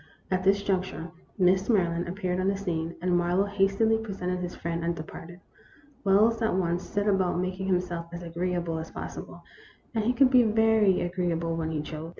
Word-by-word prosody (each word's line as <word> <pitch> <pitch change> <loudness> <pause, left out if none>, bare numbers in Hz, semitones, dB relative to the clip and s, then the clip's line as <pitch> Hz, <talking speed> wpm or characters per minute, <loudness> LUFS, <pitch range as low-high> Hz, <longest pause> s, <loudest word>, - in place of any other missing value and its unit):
183 185 - +2
At 185 - -2
this 200 +1 +3
juncture, 185 -4 -2 0.3
Miss 190 +2 +3
Maryland 175 -5 +2
appeared 185 -1 -2
on 185 - 0
the 195 0 +1
scene, 170 -4 -3
and 180 -1 +2
Marlowe 175 +3 +2
hastily 200 +3 +2
presented 185 -4 -3
his 180 0 -5
friend 170 0 -3
and 170 0 0
departed. 170 +2 -9 0.6
Wells 215 +4 +4
at 220 -4 +1
once 175 -1 0
set 205 0 -2
about 190 -3 +2
making 185 +1 -2
himself 180 -2 -1
as 175 0 -7
agree 175 +2 -2
able 170 -2 -2
as 160 - -6
possible, - - -8 0.5
and 220 -2 0
he 235 - +2
could 265 0 +4
be 255 -2 +7
very 220 -3 +3
agreeable 175 -2 -1
when 160 -1 -2
he 155 -2 -2
chose. 155 +1 -7
180 Hz, 190 wpm, -27 LUFS, 170-200 Hz, 0.6 s, be